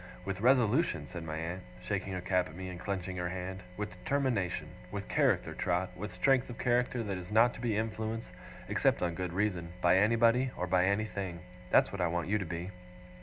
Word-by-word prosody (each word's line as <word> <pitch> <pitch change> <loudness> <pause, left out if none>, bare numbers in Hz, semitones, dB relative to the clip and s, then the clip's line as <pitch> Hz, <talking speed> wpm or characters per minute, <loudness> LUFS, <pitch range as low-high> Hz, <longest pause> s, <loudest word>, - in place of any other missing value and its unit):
With 95 0 -3
resolution,' 125 - +3
said 85 +1 -7
my 80 -1 -4
aunt, 85 +3 -4 0.2
shaking 95 - -2
her 90 - -3
cap 90 0 +1
at 80 - -12
me, 95 +1 -5
and 90 -1 -7
clenching 95 -1 -3
her 90 0 -1
hand. 95 +1 -5 0.2
'With 105 0 -3
determination. 115 -2 -1 0.2
With - - -4
character, - - +2
Trot 90 +1 0
with 105 +3 -5
strength 135 -2 +2
of 120 - -7
character 125 0 +1
that 100 -3 -3
is 90 +1 -9
not 115 +3 +5
to - - -9
be 115 -4 0
influenced, 110 +1 -2 0.4
except - - +2
on 85 -1 0
good 90 0 -3
reason, 90 -3 -1
by 90 +1 +5
anybody, 115 +4 +4
or 90 - -1
by 90 0 +3
anything. 100 -4 -1 0.3
That's - - +5
what 100 - -3
I 90 - +3
want 85 +1 -2
you 105 +1 +2
to 95 - -3
be. 85 +3 -4
95 Hz, 205 wpm, -32 LUFS, 90-110 Hz, 0.4 s, not